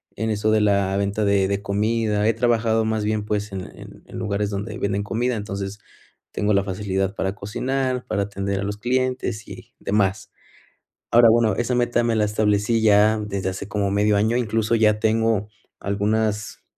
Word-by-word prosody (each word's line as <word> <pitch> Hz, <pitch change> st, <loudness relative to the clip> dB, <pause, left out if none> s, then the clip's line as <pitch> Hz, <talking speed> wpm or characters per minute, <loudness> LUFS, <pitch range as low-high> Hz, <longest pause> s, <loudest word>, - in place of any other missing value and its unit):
en 110 Hz, +2 st, -2 dB
eso 110 Hz, 0 st, 0 dB
de 110 Hz, 0 st, +3 dB
la 100 Hz, -2 st, +2 dB
venta 100 Hz, +1 st, 0 dB
de 100 Hz, -1 st, +3 dB
de 100 Hz, 0 st, -1 dB
comida, 105 Hz, +1 st, 0 dB
he 115 Hz, -, +3 dB
trabajado, 115 Hz, -2 st, +2 dB
más 110 Hz, -1 st, -1 dB
bien, 105 Hz, -1 st, -1 dB
pues, 105 Hz, 0 st, -2 dB
en 95 Hz, -1 st, -4 dB
la -, -, -11 dB
en -, -, -13 dB
en -, -, -9 dB
lugares 105 Hz, -2 st, -1 dB
donde 105 Hz, +3 st, -4 dB
venden 100 Hz, 0 st, -1 dB
comida, 120 Hz, +4 st, -1 dB
entonces, 100 Hz, -1 st, -5 dB, 0.5 s
tengo 105 Hz, 0 st, 0 dB
la 100 Hz, 0 st, +3 dB
facilidad 95 Hz, 0 st, -2 dB
para 95 Hz, +1 st, -2 dB
cocinar, 130 Hz, +5 st, -2 dB
para 100 Hz, -, 0 dB
atender 100 Hz, -1 st, -3 dB
a -, -, -2 dB
los 105 Hz, +1 st, -3 dB
clientes 125 Hz, -2 st, -1 dB
y -, -, -11 dB
demás. 100 Hz, -1 st, 0 dB, 0.8 s
Ahora, 120 Hz, -1 st, +7 dB
bueno, 110 Hz, -3 st, +3 dB
esa 120 Hz, +3 st, -1 dB
meta 120 Hz, -1 st, +1 dB
me 115 Hz, -1 st, +1 dB
la 105 Hz, -1 st, +2 dB
establecí 105 Hz, +1 st, +1 dB
ya 110 Hz, 0 st, +4 dB
desde 100 Hz, -3 st, -3 dB
hace 95 Hz, +2 st, -6 dB
como 100 Hz, -1 st, -1 dB
medio 105 Hz, 0 st, +2 dB
año. 110 Hz, +3 st, +1 dB
Incluso 115 Hz, -2 st, 0 dB
ya 105 Hz, -1 st, +3 dB
tengo 110 Hz, -1 st, +1 dB, 0.3 s
algunas, 105 Hz, +1 st, -1 dB
105 Hz, 180 wpm, -22 LUFS, 100-110 Hz, 0.8 s, Ahora